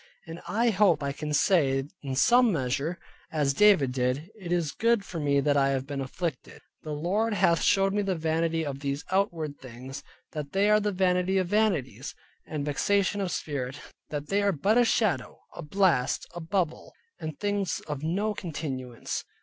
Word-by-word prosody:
And 165 0 -8
I 225 +6 +2
hope 185 -6 +3
I 140 - -1
can 150 +2 -5
say 140 -4 +3 0.2
in 135 -2 -4
some 240 - +5
measure, 140 +2 -1 0.3
as 145 -3 +1
David 185 -7 +5
did, 130 +7 -1
"It 190 -6 -8
is 170 -4 +1
good 230 +1 +1
for 170 - -6
me 140 -2 +2
that 145 +1 +2
I 135 -1 +3
have 135 -1 -1
been 140 -1 -4
afflicted." 150 +2 -5 0.2
The 155 - -7
Lord 205 +9 0
hath 175 -4 +3
showed 195 0 +3
me 205 - +1
the 195 -2 -1
vanity 165 0 0
of 140 -2 -4
these 140 0 -3
outward 165 -6 -1
things. 130 +2 -9 0.3
That 150 -2 -6
they 200 +2 +3
are 210 - +6
the 210 0 0
vanity 185 0 +1
of 185 -2 0
vanities, 160 - 0 0.3
and 150 -2 -3
vexation 200 +7 +1
of 190 - -1
spirit, 140 -3 -4 0.3
that 145 -1 -5
they 200 +1 +2
are 200 0 +3
but 200 +8 +2
a 245 - +5
shadow, 220 -3 0 0.2
a - - -6
blast, 170 -5 +1
a 175 - -6
bubble, 165 -1 -2 0.3
and 155 -2 -6
things 205 -2 -1
of 145 -3 -5
no 195 +7 0
continuance. 140 - -5
165 Hz, 180 wpm, -27 LUFS, 140-195 Hz, 0.3 s, are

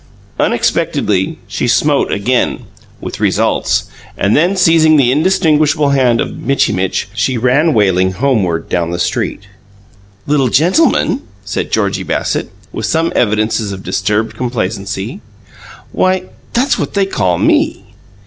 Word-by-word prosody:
Unexpectedly, 95 -2 0
she 100 - -2
smote 140 +4 +2
again 120 +5 0 0.4
with - - -7
results - - +1 0.3
and 100 +2 +1
then, 175 +6 +2
seizing 165 -3 +4
the 125 -3 +3
indistinguishable 155 -2 +2
hand 125 -4 +2
of - - -3
Mitchy 135 -2 +1
Mitch, 95 0 -1
she 125 +3 0
ran 135 +7 +2
wailing 95 -3 +2
homeward 95 -8 0
down 85 -2 -1
the 85 - -3
street. 85 - -2 0.8
"'Little 140 -3 +2
gentleman'?" 175 - +2 0.2
said - - -3
Georgie - - 0
Bassett, - - -2 0.2
with - - -3
some 165 +1 0
evidences 110 -1 0
of 95 -1 -7
disturbed 105 +3 -1
complacency. 110 -4 -4 0.7
"Why, 185 0 +1 0.3
that's 255 +4 +1
what - - -4
they 200 -1 +2
call 95 - 0
ME!" - - +1
125 Hz, 130 wpm, -14 LUFS, 100-155 Hz, 0.8 s, seizing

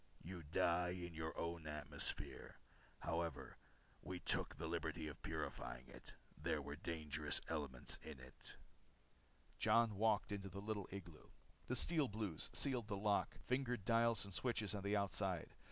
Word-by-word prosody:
You 90 +1 -5
die 90 +2 +2
in 85 -1 -5
your 80 0 -3
own 85 -1 -2
atmosphere. 75 -1 -1 0.4
However, 85 -3 -2 0.4
we 90 0 -4
took - - 0
the - - -4
liberty 80 - -1
of 75 - -7
purifying 65 0 -3
it. - - -9 0.2
There 75 - 0
were 70 0 -4
dangerous 80 -2 +2
elements 70 -6 +3
in 75 -4 -7
it." 65 +1 -4 1.0
Jon 115 +1 +5
walked 105 +1 +3
into 100 -1 -3
the 100 - -6
little 105 -1 -2
igloo. 90 -5 -8 0.4
The 130 - +1
Steel 155 +2 +3
Blues 105 -7 -2
sealed 125 -6 0
the 100 -2 -1
lock, 105 0 +2
fingered 125 -5 0
dials 115 -2 +4
and 100 - -9
switches 110 -2 0
on 100 - -2
the 100 +2 +1
outside. 95 -2 0
95 Hz, 150 wpm, -43 LUFS, 80-105 Hz, 1.0 s, Jon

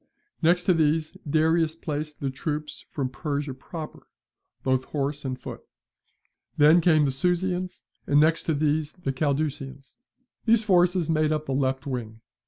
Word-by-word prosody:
Next 175 +2 +3
to 185 - +4
these 155 -1 +1
Darius 160 +1 +2
placed 150 -2 -5
the 135 -1 -1
troops 150 +2 -5
from 135 -3 -2
Persia 145 -1 -3
proper, 155 +4 -9 0.6
both 130 -1 +1
horse 145 0 -3
and 130 -2 -4
foot. - - -8 1.0
Then 155 +4 +6
came 155 -3 +4
the 135 - +1
Susians, 180 +5 -1 0.2
and 145 - +4
next 160 +2 +3
to 160 - +1
these 150 +1 0
the 155 -7 -4
Cadusians. 140 -1 -2 0.5
These 225 -1 +4
forces 180 -4 +3
made 155 -1 +2
up 155 0 -1
the 135 - -2
left 130 0 0
wing. 115 -5 -5
150 Hz, 150 wpm, -26 LUFS, 140-165 Hz, 1.0 s, Then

